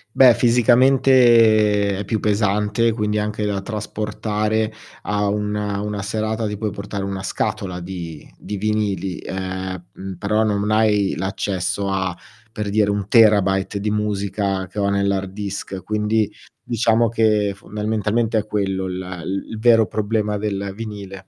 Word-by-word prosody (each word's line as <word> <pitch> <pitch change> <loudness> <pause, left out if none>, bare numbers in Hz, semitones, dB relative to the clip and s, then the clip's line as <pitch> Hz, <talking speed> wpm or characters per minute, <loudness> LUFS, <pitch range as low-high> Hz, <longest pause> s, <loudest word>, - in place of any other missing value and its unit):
Beh, 130 -3 +8
fisicamente 120 -4 +4
è - - -2
più 110 +2 -1
pesante, 105 +2 +1
quindi 105 -1 -1
anche 105 0 -2
da 100 -2 -1
trasportare 105 +1 -2 0.3
a 105 0 0
una 105 0 -2
una 105 -1 -3
serata. 110 +2 -2
Ti 105 - -4
puoi 105 0 -2
portare 100 0 -5
1 95 -1 -4
scatola 95 -1 -3
di 85 -4 -7
di 105 - -6
vinili, 100 -3 -1
ehm, 95 -1 -5
mhmm, 95 0 -7
però 105 +3 +1
non 105 -2 0
m 105 +1 -1
hai 105 -2 +3
l'accesso 95 +1 -2
a 95 -2 -1 0.4
per 105 -2 -4
dire 105 0 +2
1 100 -1 -1
terabyte 100 -3 +4
di 105 +1 -1
musica, 100 -2 -1
che 100 +4 -7
ho 100 0 +1
nell'hard 100 -1 0
disk, 95 -2 -5
quindi 105 +1 0 0.3
diciamo 115 -1 +2
che 105 -3 +2
fondamentalmente 110 +2 -1
è 110 - -5
quello 95 -2 -1
la 90 -1 -5
il 95 +4 -3
il 110 - -5
vero 115 -1 +5
problema 105 0 -1
del 100 -2 -3
vinile. 100 -3 -8
105 Hz, 145 wpm, -21 LUFS, 95-110 Hz, 0.4 s, Beh